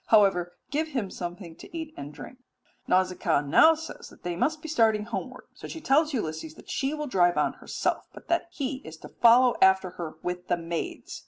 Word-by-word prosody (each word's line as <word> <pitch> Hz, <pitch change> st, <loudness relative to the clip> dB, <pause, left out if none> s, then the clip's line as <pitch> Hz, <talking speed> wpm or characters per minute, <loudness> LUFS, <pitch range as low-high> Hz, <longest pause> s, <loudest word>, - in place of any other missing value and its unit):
However, 195 Hz, -5 st, +4 dB
give 310 Hz, +2 st, 0 dB
him 240 Hz, -11 st, -3 dB
something 175 Hz, -1 st, -7 dB
to 335 Hz, -, -9 dB
eat 320 Hz, -1 st, -6 dB
and 140 Hz, +1 st, -7 dB
drink." 250 Hz, -, -11 dB, 0.5 s
Nausicaa 185 Hz, -5 st, +2 dB
now 160 Hz, -, +6 dB
says 320 Hz, +1 st, -9 dB
they 175 Hz, -1 st, -2 dB
must 310 Hz, -, 0 dB
be -, -, -5 dB
starting 225 Hz, -8 st, +3 dB
homeward; 235 Hz, +3 st, -5 dB
so -, -, -10 dB
she 325 Hz, -, -7 dB
tells 305 Hz, +1 st, +3 dB
Ulysses 160 Hz, -, -4 dB
that -, -, -11 dB
she 270 Hz, +1 st, 0 dB
will 300 Hz, 0 st, -3 dB
drive 175 Hz, -9 st, +3 dB
on -, -, +2 dB
first -, -, -22 dB
herself, -, -, -2 dB
but -, -, -14 dB
that 340 Hz, 0 st, +1 dB
he 275 Hz, -5 st, -3 dB
is 160 Hz, -, -11 dB
to -, -, -11 dB
follow 240 Hz, +1 st, +5 dB
after 190 Hz, -1 st, +5 dB
her 160 Hz, -2 st, -5 dB
with 180 Hz, 0 st, -4 dB
the 175 Hz, -, +1 dB
maids. 165 Hz, 0 st, -5 dB
210 Hz, 200 wpm, -27 LUFS, 175-280 Hz, 0.5 s, now